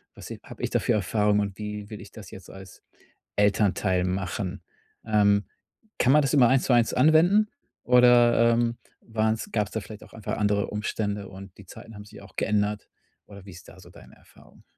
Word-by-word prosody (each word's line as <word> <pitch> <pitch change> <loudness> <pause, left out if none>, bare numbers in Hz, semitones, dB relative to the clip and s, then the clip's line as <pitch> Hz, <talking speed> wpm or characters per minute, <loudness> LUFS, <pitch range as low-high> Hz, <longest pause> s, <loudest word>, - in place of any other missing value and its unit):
Was - - -11
i - - -8
habe - - -12
ich - - -1
da - - 0
für - - 0
Erfahrungen 105 0 +1
und 100 -2 -5
wie 105 0 -7
will 105 - -8
ich 100 - -13
das 105 -5 -12
jetzt 95 -3 -12
als 95 -2 -13 0.6
Elternteil 100 -3 +1
machen?“ 90 0 -4 0.4
Ähm, 100 -2 +2 0.5
kann 125 - +3
man 150 - +5
das 135 - -1
immer 130 -5 +5
eins 130 0 +2
zu 125 - +1
eins 120 -1 +2
anwenden 170 +10 +4 0.3
oder, 120 -1 +5
ähm, 115 0 0 0.2
waren's 110 -1 -2
gab's 105 -3 -1
da 110 - -3
vielleicht 105 +2 -11
auch - - -18
einfach 110 - -5
andere 105 -1 0
Umstände 105 -1 -4
und 95 0 -12
die 100 - -14
Zeiten 110 +5 -13
haben 105 - -11
sich 105 +1 -14
auch - - -16
geändert? 105 0 -1 0.4
Oder 100 -1 -14
wie 95 - -11
ist 90 - -14
da - - -16
so - - -16
deine - - -17
Erfahrung? - - -22
105 Hz, 200 wpm, -25 LUFS, 100-115 Hz, 0.6 s, man